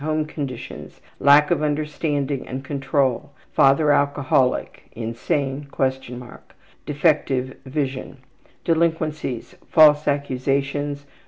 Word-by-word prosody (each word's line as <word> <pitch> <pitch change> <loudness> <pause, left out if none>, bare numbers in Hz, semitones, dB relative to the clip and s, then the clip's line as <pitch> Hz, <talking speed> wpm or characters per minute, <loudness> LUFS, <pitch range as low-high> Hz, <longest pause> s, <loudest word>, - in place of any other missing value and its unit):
Home 155 +1 -1
conditions: 140 -5 -7 0.2
Lack 145 +2 +6
of 165 -4 +2
understanding 150 -2 -2
and 130 +2 -6
control. 135 -1 -1 0.2
Father 140 +2 +4
alcoholic, 140 -3 +1
insane 135 +5 -3 0.6
(?) - - -19
Defective 140 -4 +1
vision. 135 -1 -3 0.5
Delinquencies: 160 -6 -1
Mentality: 180 - -24
False 150 -2 +6
accusations. 140 +1 -1
145 Hz, 90 wpm, -22 LUFS, 135-150 Hz, 0.6 s, Lack